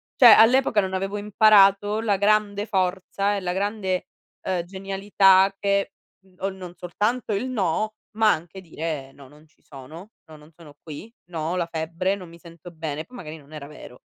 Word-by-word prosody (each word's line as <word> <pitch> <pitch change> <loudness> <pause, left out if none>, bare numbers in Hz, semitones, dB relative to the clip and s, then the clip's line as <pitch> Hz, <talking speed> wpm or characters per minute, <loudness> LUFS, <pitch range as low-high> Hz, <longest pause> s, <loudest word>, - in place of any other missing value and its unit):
Cioè, 240 -4 +8
all'epoca 235 -2 +5
non 190 0 -4
avevo 195 +2 -3
imparato 205 0 +4
la 205 -3 +1
grande 205 0 +1
forza 195 0 -1
e - - -2
la 180 -1 -2
grande, 195 -2 -2 0.4
uhm, 185 -2 -1
genialità 195 +1 +2
che, 200 0 0 0.3
mhmm, 185 -1 -25
o 195 - -1
non 185 -2 -9
soltanto 210 +7 -2
il 205 +6 -2
no, 215 -1 -1 0.2
ma 220 -1 +5
anche 170 +4 -8
dire: 155 -5 -6
"No, 140 -1 -15
non 150 +3 -19
ci 155 - -35
sono. 155 +9 -12 0.2
No, 155 - -14
non 150 +2 -18
sono 155 -3 -15
qui. 165 +9 -10 0.2
No, 160 -1 -3
ho - - -1
la 170 -1 -1
febbre, 165 +4 -2
non 180 -4 -11
mi 170 - -15
sento 170 0 -13
bene." 155 -1 -5
Poi, 250 - -16
magari 160 -2 -8
non 145 +1 -17
era 145 -2 -8
vero. 125 -4 -13
190 Hz, 185 wpm, -23 LUFS, 165-205 Hz, 0.4 s, Cioè